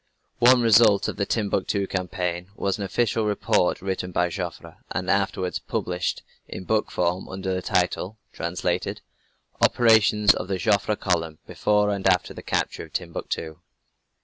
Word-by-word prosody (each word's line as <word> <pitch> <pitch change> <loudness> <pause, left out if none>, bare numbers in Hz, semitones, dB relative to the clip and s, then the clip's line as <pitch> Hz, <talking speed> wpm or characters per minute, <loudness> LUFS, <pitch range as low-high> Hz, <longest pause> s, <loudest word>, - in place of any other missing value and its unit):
One 125 +1 +6
result 110 -2 +5
of - - -4
the 100 - -1
Timbuctoo 100 -2 0
campaign 90 -1 -3
was 100 0 -2
an - - -2
official 110 +2 0
report 100 -3 +1
written 95 -1 -3
by 90 0 +1
Joffre, - - -6
and 90 +2 -1
afterwards 95 -2 0
published 90 0 -3 0.2
in 95 - -7
book 110 +3 0
form 90 +1 -1
under 95 0 -3
the 90 - -2
title 90 +4 -1 0.2
(translated) 90 +1 -2 0.6
"Operations 110 -3 +5
of 90 - -5
the 95 -1 -1
Joffre 105 +2 +1
Column 85 -5 -1
before 105 0 +1
and 100 -1 -1
after 90 -1 +2
the - - -9
Capture - - -2
of - - -20
Timbuctoo." 85 -2 -4
95 Hz, 150 wpm, -24 LUFS, 90-105 Hz, 0.6 s, One